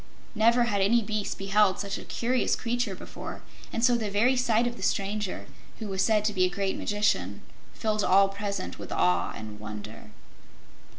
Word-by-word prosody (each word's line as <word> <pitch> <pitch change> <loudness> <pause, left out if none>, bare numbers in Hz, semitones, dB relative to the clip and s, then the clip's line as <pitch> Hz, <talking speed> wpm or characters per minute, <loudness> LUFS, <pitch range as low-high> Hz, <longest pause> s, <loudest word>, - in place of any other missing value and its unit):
Never 235 +2 +4
had 205 -4 0
any 230 +4 +4
beast 215 -1 -3
beheld 195 0 +3
such 200 -1 -3
a - - -9
curious 250 +2 0
creature 240 -4 -2
before, - - -8 0.3
and 230 - +1
so 245 -1 +4
the 220 -3 -1
very 225 +6 +3
sight 240 -2 +2
of 240 0 -2
the 195 - -11
stranger, 200 +1 -1 0.3
who 220 - -5
was 190 -1 -1
said 215 -2 +2
to 210 - +1
be 185 -2 +2
a 185 - +3
great 195 +1 -2
magician, 105 - 0 0.3
filled 215 -1 0
all 195 +1 +5
present 200 - -4
with - - -8
awe 90 0 +2
and 105 -1 -8
wonder. 105 0 -8
205 Hz, 180 wpm, -27 LUFS, 190-225 Hz, 0.3 s, all